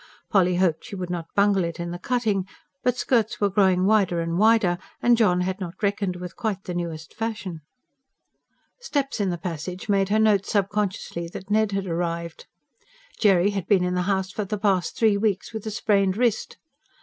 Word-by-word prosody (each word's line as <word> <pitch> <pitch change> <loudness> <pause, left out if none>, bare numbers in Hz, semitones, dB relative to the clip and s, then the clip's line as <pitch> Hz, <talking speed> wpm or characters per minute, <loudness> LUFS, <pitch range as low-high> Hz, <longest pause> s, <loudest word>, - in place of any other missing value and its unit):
Polly 180 -3 +3
hoped 175 -3 +1
she 220 - -7
would 180 -2 -5
not 165 -2 -5
bungle 200 -2 +3
it 170 0 -4
in 170 0 -4
the 175 - -6
cutting; 215 -4 0 0.4
but 250 0 +1
skirts 230 -4 +1
were 205 -1 +2
growing 190 -2 +3
wider 195 -5 +3
and 165 +1 -1
wider, 215 -5 +4 0.2
and 240 0 +4
John 180 -6 +3
had 185 +2 -2
not 180 -2 -6
reckoned 200 -2 0
with 180 0 -8
quite 215 -6 -3
the 180 - -5
newest 165 -2 -5
fashion. 215 -7 -4 1.2
Steps 285 - -2
in 200 -2 +1
the 175 - -2
passage 180 +2 -5
made 195 -1 +2
her 210 - +2
note 210 -3 +3
subconsciously 195 -4 -1
that 190 +4 -9
Ned 215 -1 +2
had 195 0 -1
arrived 170 -1 -3 0.7
Jerry 195 -2 +4
had 195 -4 -4
been 190 -3 +4
in 180 0 0
the 180 - 0
house 190 -1 0
for 210 - -3
the 210 +2 -3
past 195 -4 0
three 220 -3 +3
weeks, 205 0 -1
with 220 -1 -5
a - - 0
sprained 200 -2 +1
wrist. 235 -3 0
195 Hz, 190 wpm, -24 LUFS, 180-210 Hz, 1.2 s, wider